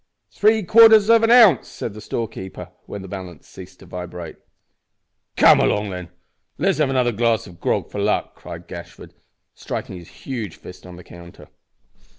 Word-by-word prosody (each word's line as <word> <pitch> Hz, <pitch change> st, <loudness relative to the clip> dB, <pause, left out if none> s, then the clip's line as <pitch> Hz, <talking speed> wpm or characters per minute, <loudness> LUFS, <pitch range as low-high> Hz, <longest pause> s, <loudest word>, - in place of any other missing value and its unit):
"Three 215 Hz, +1 st, +2 dB
quarters 220 Hz, +2 st, +6 dB
of 230 Hz, -1 st, +5 dB
an 225 Hz, -, +2 dB
ounce," 225 Hz, -, +6 dB
said 110 Hz, -, -7 dB
the 105 Hz, -, -11 dB
storekeeper, 95 Hz, -6 st, -6 dB, 0.2 s
when 100 Hz, -, -8 dB
the -, -, -9 dB
balance 90 Hz, -5 st, -9 dB
ceased -, -, -14 dB
to -, -, -14 dB
vibrate. 90 Hz, -2 st, -8 dB, 1.0 s
"Come -, -, +6 dB
along, 105 Hz, -1 st, 0 dB
then, 90 Hz, -1 st, -6 dB
an' -, -, -31 dB, 0.5 s
let's 190 Hz, +1 st, 0 dB
have 150 Hz, -3 st, +2 dB
another 125 Hz, -2 st, +1 dB
glass 115 Hz, 0 st, 0 dB
of 90 Hz, -3 st, -15 dB
grog -, -, -2 dB
for -, -, -5 dB
luck," -, -, -1 dB
cried 85 Hz, 0 st, -11 dB
Gashford, 85 Hz, -1 st, -11 dB, 0.4 s
striking 95 Hz, -, -7 dB
his 85 Hz, -, -14 dB, 0.2 s
huge 115 Hz, -, -5 dB
fist 90 Hz, 0 st, -13 dB
on 90 Hz, -, -11 dB
the 90 Hz, -, -13 dB
counter. 85 Hz, 0 st, -15 dB
105 Hz, 170 wpm, -20 LUFS, -, 1.0 s, quarters